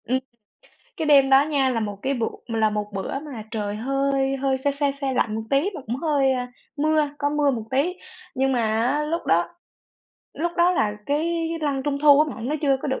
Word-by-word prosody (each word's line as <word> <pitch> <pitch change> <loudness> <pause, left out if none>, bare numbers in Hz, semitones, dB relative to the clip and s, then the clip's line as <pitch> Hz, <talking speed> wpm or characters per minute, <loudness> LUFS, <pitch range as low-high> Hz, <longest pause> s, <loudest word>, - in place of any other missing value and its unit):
Ừm, 255 +3 +1 0.8
cái 320 -4 -2
đêm 275 -2 +5
đó 270 +1 +7
nha 280 -3 +1
là 235 -3 -1
một 205 -2 -4
cái 275 +1 0
bựa 230 -3 -1 0.2
là 220 -2 +1
một 210 0 -4
bữa 195 +7 -3
mà 275 -8 -8
trời 210 -2 -3
hơi 275 +3 0
hơi 265 0 0
se 280 +2 0
se 280 0 0
se 275 -1 -3
lạnh 225 -4 0
một 220 - -3
tí, 280 +8 +2
mà 310 - -6
cũng 235 +3 -2
hơi, 280 -3 +2
à, 250 -1 -3 0.2
mưa, 305 0 +2
có 285 -1 0
mưa 295 -1 +2
một 230 -5 -3
tí, 285 +7 +1 0.4
nhưng 270 0 +1
mà 245 - +1
á, 230 +7 +1
lúc 330 +3 -3
đó 170 +1 +2 0.9
lúc 345 +2 -2
đó 345 0 +4
là 215 -11 +1
cái 325 +3 0
Lân 280 -3 -1
Trung 285 -1 -1
Thu 290 -1 +7
á 305 -3 +1
bạn, 230 +2 -5
nó 300 - 0
chưa 275 -2 +3
có - - -2
được 265 - -1
275 Hz, 225 wpm, -23 LUFS, 240-295 Hz, 0.9 s, đó